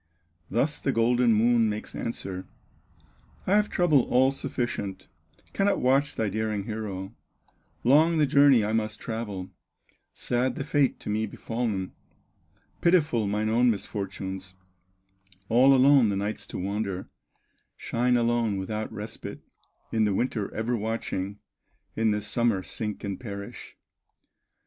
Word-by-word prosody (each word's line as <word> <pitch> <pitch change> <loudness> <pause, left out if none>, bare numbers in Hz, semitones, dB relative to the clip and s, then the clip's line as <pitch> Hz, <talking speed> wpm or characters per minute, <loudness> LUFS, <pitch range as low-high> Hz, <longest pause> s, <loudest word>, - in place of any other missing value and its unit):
Thus 145 +6 0
the 135 - +1
golden 120 0 +3
Moon 115 +1 +4
makes 105 +1 -5
answer: 95 -5 -5 1.0
"I - - -1
have 210 0 +3
trouble 155 -8 +3
all 130 +2 +4
sufficient, 120 -7 -4 0.5
Cannot 200 0 +2
watch 135 +3 +2
thy 110 - 0
daring 110 0 -2
hero; 105 -2 -5 0.7
Long 155 +6 +5
the 155 - +4
journey 140 -5 +5
I 110 - -1
must 110 -1 -1
travel, 105 -5 -5 0.6
Sad 125 +1 -1
the - - -3
fate 145 -2 +1
to - - -6
me 110 +1 0
befallen, 115 -5 -3 0.9
Pitiful 155 - +3
mine 105 +2 0
own 120 +2 +4
misfortunes, 95 -3 -4 0.9
All 130 +4 +6
alone 135 -3 +6
the 100 - 0
nights 100 +2 -3
to - - -6
wander, 100 0 -3 0.7
Shine 125 +1 +1
alone 115 -3 +1
without 105 +3 -3
a - - -10
respite, 105 +1 -7 0.5
In 110 -1 +2
the 100 -2 +1
winter 110 -3 -1
ever 115 +2 -1
watching, 105 -3 -3 0.6
In 110 0 +2
the 105 0 0
summer 110 -2 +1
sink 105 +2 -4
and 100 -2 -4
perish." 100 -4 -8
110 Hz, 130 wpm, -27 LUFS, 105-125 Hz, 1.0 s, All